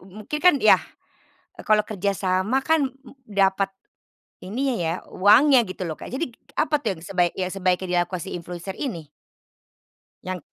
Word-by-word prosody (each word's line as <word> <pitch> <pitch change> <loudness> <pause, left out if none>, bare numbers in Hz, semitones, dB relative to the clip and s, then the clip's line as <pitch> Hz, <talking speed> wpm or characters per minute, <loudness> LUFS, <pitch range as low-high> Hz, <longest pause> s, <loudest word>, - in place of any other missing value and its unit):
u - - -17 0.2
mungkin 300 - -3
kan, 360 0 +6
yah - - +6 0.9
kalau 215 0 +4
kerjasama 200 +4 -1
kan 315 -3 +2
m 270 0 -18 0.2
dapat 195 -1 +2 0.7
ininya 250 +7 -2
ya 165 -5 -1
uangnya 255 +8 +5
gitu 185 0 -6
loh, 160 - -3
Kak, - - -8
jadi 270 +7 -2
k - - -25
k - - -25
apa 310 -1 +2
tuh 225 - -1
yang - - -14
sebaiknya 180 0 0
sebaiknya 185 -1 0
dilakukan 175 0 -4
si 190 - -7
influencer 175 +2 -6
ini? 170 - -5 1.1
Yang 185 -1 -5
195 Hz, 160 wpm, -24 LUFS, 185-255 Hz, 1.1 s, kan